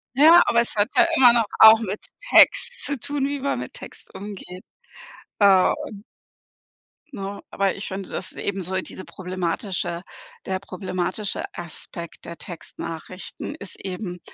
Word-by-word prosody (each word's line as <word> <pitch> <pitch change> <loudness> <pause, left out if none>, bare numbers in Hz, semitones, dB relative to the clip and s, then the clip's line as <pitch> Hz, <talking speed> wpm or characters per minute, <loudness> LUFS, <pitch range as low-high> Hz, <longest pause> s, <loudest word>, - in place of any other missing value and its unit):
Ja, 320 +5 +8
aber 235 0 +4
es 235 - -3
hat 205 0 +3
ja 350 - +7
immer 245 -3 +8
noch 230 -2 +3
auch 220 0 +10
mit 210 -2 -4 0.3
Text 485 0 +5
zu 285 -3 -2
tun, 285 0 -2
wie 285 0 -3
man 280 +1 -1
mit - - -7
Text - - -11
umgeht, 190 -2 -8 0.8
äh 195 -2 +6 1.4
ne? 200 -5 -6
Aber 195 -1 0
ich 200 - -6
finde, 190 -1 -6
das - - -4
ist - - -17
eben 195 -1 -3
so 185 +1 -2
diese 185 - -9
problematische 180 -1 -3 0.4
der 190 0 -2
problematische 185 +1 -3
Aspekt 170 0 -7
der 170 - -8
Textnachrichten 170 +1 -7
ist 200 - -8
eben 180 -1 -5
195 Hz, 145 wpm, -23 LUFS, 185-230 Hz, 1.4 s, auch